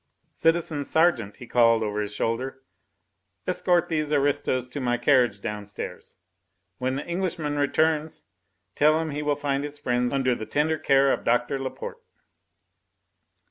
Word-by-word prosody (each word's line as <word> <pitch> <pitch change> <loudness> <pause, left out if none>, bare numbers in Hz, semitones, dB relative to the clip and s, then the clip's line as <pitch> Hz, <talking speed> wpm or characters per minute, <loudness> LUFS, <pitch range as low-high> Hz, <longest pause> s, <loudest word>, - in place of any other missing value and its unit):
Citizen 165 -3 +1
sergeant," 140 -9 +2
he 125 - -11
called 115 -1 +4
over 105 0 -2
his 105 -1 -4
shoulder, 130 +5 -3 0.8
"escort 175 -1 +2
these 155 -3 -1
aristos 145 -3 +1
to 125 +3 -6
my 120 -2 0
carriage 120 -4 +3
downstairs. 105 0 -6 0.6
When 130 +1 -1
the 140 - -4
Englishman 170 -5 -2
returns, 155 +2 +1 0.5
tell 155 +2 +4
him 160 -1 -3
he 145 +1 -3
will 145 -1 +1
find 140 -1 -1
his 145 0 -6
friends 125 -2 0
under 135 -2 +1
the 110 -2 -5
tender 155 +2 0
care 135 0 +4
of - - -3
Doctor 120 +3 +1
Laporte. 465 - -6
140 Hz, 140 wpm, -25 LUFS, 120-155 Hz, 0.8 s, called